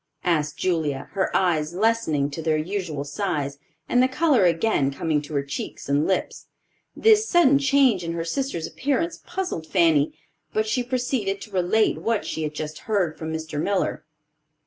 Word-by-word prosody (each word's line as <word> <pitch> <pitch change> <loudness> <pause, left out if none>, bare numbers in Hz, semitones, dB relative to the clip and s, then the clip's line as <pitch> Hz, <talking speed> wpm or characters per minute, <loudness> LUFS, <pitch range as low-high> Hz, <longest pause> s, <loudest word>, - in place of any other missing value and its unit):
asked 155 -4 0
Julia, 160 -7 -1
her 190 -1 0
eyes 170 -3 0
lessening 185 -10 +1
to 150 - -5
their 160 -1 +1
usual 165 -3 -3
size, 145 -2 -3 0.3
and 245 - +3
the 255 - +5
color 260 - +3
again 165 -4 +2
coming 150 +2 -1
to 150 +1 -8
her 140 - +1
cheeks 140 - -6
and 140 +2 +2
lips. 190 - -2 0.5
This 435 0 +4
sudden 285 -6 +5
change 265 -8 +3
in 165 0 -3
her 165 0 -3
sister's 260 -3 -2
appearance 290 +5 -2
puzzled 360 - -4
Fanny; 160 -6 +3 0.4
but 215 - +1
she 220 +3 +1
proceeded 245 -5 -1
to 215 - -10
relate 190 +4 +2
what 225 -2 -1
she 160 - -4
had 150 -1 -3
just 150 0 -5
heard 185 -7 +1
from 160 0 -5
Mr. 160 -2 -4
Miller. 200 +2 -1
175 Hz, 170 wpm, -24 LUFS, 155-230 Hz, 0.5 s, the